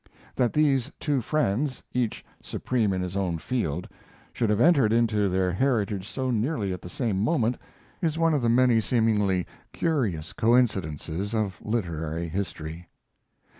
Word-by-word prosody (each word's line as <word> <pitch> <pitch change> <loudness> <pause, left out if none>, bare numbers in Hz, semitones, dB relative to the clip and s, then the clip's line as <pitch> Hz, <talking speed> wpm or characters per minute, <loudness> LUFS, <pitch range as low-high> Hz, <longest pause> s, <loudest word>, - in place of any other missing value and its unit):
That 125 -3 +1
these 140 -3 +2
two 145 -4 0
friends, 130 0 0
each 125 -3 -1 0.2
supreme 115 -5 -1
in 95 -1 -1
his 90 +1 -5
own 90 -4 0
field, 85 - -2 0.5
should 115 - 0
have 105 0 +2
entered 140 -7 +5
into 110 -3 +2
their 90 0 +1
heritage 105 -3 0
so 130 -1 -2
nearly 110 -4 0
at 90 - -7
the 90 - -9
same 105 -3 -1
moment, 125 -4 +2 0.5
is 160 -3 0
one 165 -1 +3
of 145 - +1
the 120 - +2
many 120 -1 +4
seemingly 105 -5 +2 0.3
curious 105 - -1
coincidences 100 - +1
of 100 -5 -1
literary 85 -6 -2
history. 85 -2 -5
110 Hz, 145 wpm, -26 LUFS, 95-125 Hz, 0.5 s, entered